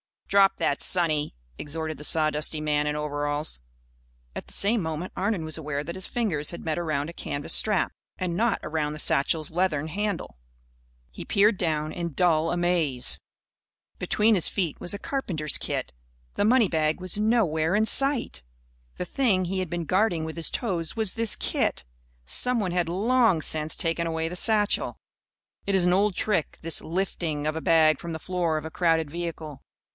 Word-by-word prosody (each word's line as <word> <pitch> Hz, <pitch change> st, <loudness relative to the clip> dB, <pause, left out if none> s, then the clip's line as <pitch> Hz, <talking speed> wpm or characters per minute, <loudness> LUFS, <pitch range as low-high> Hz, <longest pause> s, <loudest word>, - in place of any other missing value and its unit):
"Drop 195 Hz, -1 st, +4 dB
that, 140 Hz, -, -1 dB
sonny!" 155 Hz, -, +1 dB, 0.2 s
exhorted 155 Hz, 0 st, -4 dB
the 150 Hz, -, -4 dB
sawdusty 155 Hz, 0 st, +2 dB
man 150 Hz, -1 st, 0 dB
in 150 Hz, -, -1 dB
overalls. 145 Hz, -, -2 dB, 0.7 s
At -, -, -7 dB
the -, -, -4 dB
same 210 Hz, +2 st, +3 dB
moment 160 Hz, +2 st, -4 dB
Arnon 195 Hz, -3 st, -1 dB
was 155 Hz, 0 st, -3 dB
aware 145 Hz, -2 st, -4 dB
that 170 Hz, +3 st, -6 dB
his 190 Hz, +1 st, -2 dB
fingers 180 Hz, -12 st, -1 dB
had 170 Hz, -, -8 dB
met 160 Hz, 0 st, -2 dB
around 155 Hz, -3 st, -2 dB
a -, -, -8 dB
canvas 145 Hz, -1 st, -3 dB
strap 210 Hz, -4 st, +3 dB, 0.3 s
and 180 Hz, -2 st, -3 dB
not 230 Hz, +1 st, +1 dB
around 150 Hz, -1 st, -2 dB
the -, -, -7 dB
satchel's 155 Hz, +3 st, +2 dB
leathern 160 Hz, -3 st, -1 dB
handle. 200 Hz, -, -3 dB, 0.7 s
He -, -, -9 dB
peered 205 Hz, 0 st, +3 dB
down, 155 Hz, -3 st, -1 dB
in 170 Hz, -2 st, -5 dB
dull 165 Hz, 0 st, +2 dB
amaze. 175 Hz, -8 st, 0 dB, 0.8 s
Between 220 Hz, +2 st, +2 dB
his 180 Hz, -, +3 dB
feet 175 Hz, -7 st, -2 dB
was 175 Hz, -, +1 dB
a -, -, -3 dB
carpenter's 170 Hz, -, 0 dB
kit. -, -, -4 dB, 0.4 s
The 205 Hz, -, +1 dB
money 230 Hz, -3 st, +4 dB
bag 155 Hz, +1 st, 0 dB
was 185 Hz, +1 st, +3 dB
nowhere 190 Hz, -7 st, +1 dB
in 215 Hz, +1 st, +3 dB
sight. 275 Hz, -, +3 dB, 0.5 s
The -, -, -4 dB
thing 195 Hz, -4 st, +1 dB
he 190 Hz, +2 st, -2 dB
had 185 Hz, -3 st, -3 dB
been 170 Hz, 0 st, -3 dB
guarding 185 Hz, -2 st, +1 dB
with 160 Hz, +1 st, -6 dB
his 165 Hz, -, 0 dB
toes 175 Hz, -9 st, -3 dB
was 220 Hz, -4 st, +3 dB
this 230 Hz, -2 st, 0 dB
kit. -, -, -1 dB, 0.4 s
Someone 210 Hz, -, +2 dB
had 175 Hz, -1 st, 0 dB
long 220 Hz, -1 st, +2 dB
since 155 Hz, 0 st, -2 dB
taken 165 Hz, 0 st, -2 dB
away 160 Hz, 0 st, -2 dB
the 180 Hz, -, -2 dB
satchel. 210 Hz, 0 st, +2 dB, 0.7 s
It 200 Hz, -, +1 dB
is 185 Hz, -2 st, +4 dB
an 180 Hz, -, +3 dB
old 200 Hz, 0 st, +2 dB
trick, 195 Hz, -8 st, -1 dB
this 165 Hz, 0 st, +1 dB
"lifting" 165 Hz, -4 st, -3 dB
of 155 Hz, +1 st, -1 dB
a -, -, -4 dB
bag 155 Hz, -3 st, +4 dB
from 170 Hz, -1 st, -6 dB
the -, -, -4 dB
floor 175 Hz, -1 st, -1 dB
of 155 Hz, -, -4 dB
a 160 Hz, -, -6 dB
crowded 165 Hz, -4 st, +1 dB
vehicle. 160 Hz, -4 st, -6 dB
170 Hz, 180 wpm, -25 LUFS, 155-195 Hz, 0.8 s, Drop